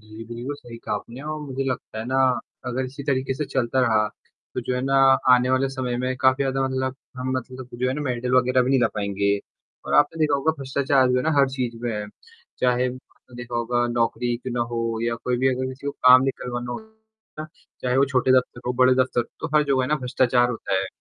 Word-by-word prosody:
जी, 110 +1 -11
बिल्कुल 120 +5 -6
सही 120 -5 -11
कहा 105 - -3
आपने 115 +5 -7
और 155 +1 -4
मुझे 135 -2 -4
लगता 125 -4 -4
है 110 - -4
ना 130 - -1 0.5
अगर 125 +1 -2
इसी 135 +2 -7
तरीके 130 -1 0
से 150 - -2
चलता 130 -2 0
रहा, 110 -3 +3 0.5
तो 125 - -1
जो 125 +1 -2
है 125 - -1
ना 135 +1 0 0.4
आने 125 +1 +2
वाले 130 +1 +2
समय 130 -2 -3
में 130 0 -1
काफ़ी 130 +1 +3
ज़्यादा 135 0 -1
मतलब 130 0 -2 0.2
हम 130 0 -3
मतलब 130 0 -7
जो 125 +1 -1
है 130 - 0
ना 150 - -4
मेडल 125 -2 -2
वगैरह 130 0 +4
भी 130 - 0
नहीं 135 - +3
ला 120 - +3
पाएँगे। 100 -1 0 0.5
और - - -1
आपने 145 +3 +3
देखा 150 -2 +3
होगा 155 +3 +1
भ्रष्टाचार 135 -1 +2
जो 125 - +2
है 125 - +1
ना 160 - +1
हर 140 -1 +5
चीज़ 125 -3 -3
में 120 - -1
है, 105 0 -4 0.5
चाहे 125 0 +2
आपने 125 -1 -10
देखा 120 -1 -5
होगा 120 +1 0
नौकरी 120 0 0
क्यों 125 +1 -6
ना 120 - 0
हो, 115 -1 -2
या 115 0 0
कोई 125 +1 -2
भी 130 +1 +3
अगर 130 +1 -2
किसी 130 +2 -9
को 145 - -1
काम 130 0 +6
निकलवाना 125 -2 -3
हो, 220 - -11 0.4
चाहे 125 0 +1
वो 135 - +5
छोटे 130 -1 +1
दफ्तर 125 -1 -5
हो, 125 - +1
बड़े 130 +1 +4
दफ्तर, 130 -1 +1 0.2
तो - - -2
हर 150 - +5
जगह 135 -2 +2
है 125 - -2
ना 150 - +2
भ्रष्टाचार 125 -1 +2
होता 115 -4 -3
है। 95 - -3
130 Hz, 235 wpm, -23 LUFS, 120-135 Hz, 0.5 s, काम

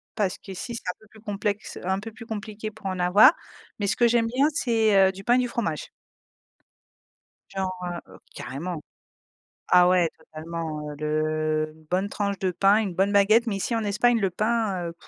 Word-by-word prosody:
parce 200 -4 0
qu'ici 195 +5 -7
c'est - - -5
un - - -1
peu 220 - -20
plus 220 - -17
complexe, 205 -1 -3
heu, - - -8
un 190 +1 +1
peu 225 +1 -7
plus 230 +1 -12
compliqué 215 -1 -5
pour 215 -1 -9
en 185 -1 -3
avoir, 180 - +7 0.5
mais 205 - -1
ce - - +1
que 240 - +3
j'aime 230 -1 +2
bien 260 +5 +2
c'est, 225 -6 +2
heu, - - -2
du 195 +1 -10
pain 240 +4 +3
et - - +4
du 250 -1 +1
fromage. 170 - -3 1.6
Genre, 190 -1 -2 0.4
heu - - -14 0.2
carrément. 160 +4 -5 0.9
Ah 180 0 +6
ouais 180 -2 +4
totalement, 160 -1 -6
heu, - - -7
le 155 0 -1
une 160 0 -21
bonne 185 +5 -1
tranche 200 -1 -2
de 190 - 0
pain, 195 +4 +4
une 195 -4 -4
bonne 195 +3 +1
baguette, 215 +4 +4
mais 205 -4 -1
ici 230 +4 -2
en 225 - 0
Espagne 230 +4 +2
le 195 - +1
pain, 210 -3 -1
heu, 165 - -8
195 Hz, 200 wpm, -25 LUFS, 175-220 Hz, 1.6 s, avoir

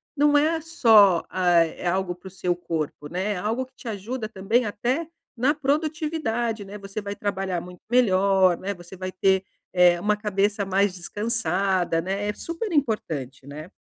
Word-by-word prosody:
não 290 0 +4
é 320 +2 +2
só, 220 - +5
hã, 185 - -4 0.2
é 165 +2 -5
algo 185 0 0
para 180 +2 -13
o - - -7
seu 180 -2 -1
corpo, 160 -4 -4
né, 190 +5 -1
é 195 - -4
algo 225 +7 -1
que 260 - -28
te 245 - -12
ajuda 220 +3 -4
também 220 +4 +1
até 250 +10 -1 0.3
na 260 +5 +2
produtividade, 290 -6 -1
né, 200 +2 -8
você 195 +1 -6
vai 200 0 -5
trabalhar 195 -4 -2
muito 180 0 -12
melhor, 195 -6 +4
né, 200 +2 -3
você 175 +1 -12
vai 185 0 -4
ter, 190 0 +2 0.3
eh, 175 -1 +5
uma 210 +3 +1
cabeça 205 0 0
mais 195 0 +2
descansada, 190 -3 0
né, 195 +4 -2
é 210 - -1
super 335 - -5
importante, 155 - -2
né. 155 +5 -9
200 Hz, 175 wpm, -24 LUFS, 185-235 Hz, 0.3 s, só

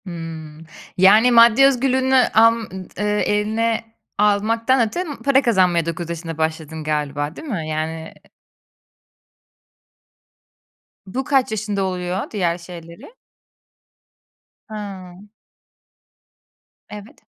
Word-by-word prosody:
Hımm. 165 -2 -8 0.3
Yani 210 +6 +6
maddi 235 +2 +6
özgürlüğünü 260 0 +2 0.2
alm 230 +1 +5 0.4
ııı, 210 - -1
eline 220 +3 0 0.3
almaktan 225 +4 +2
öte 355 +11 -4 0.2
para 275 -1 +4
kazanmaya 185 - +2
9 170 0 -5
yaşında 165 -1 -6
başladın 160 0 -3
galiba 150 0 -3
değil 320 - -10
mi 175 - -4
yani, 160 +1 -4
eee? - - -27 2.7
Bu 245 +8 -4
kaç 270 -4 +1
yaşında 205 -2 -2
oluyor 180 0 -3
diğer 175 -5 -1
şeyleri? 170 - -12 1.6
Hıı. 195 -4 -8 1.7
Evet. 210 +1 -12
195 Hz, 95 wpm, -20 LUFS, 165-230 Hz, 2.7 s, Yani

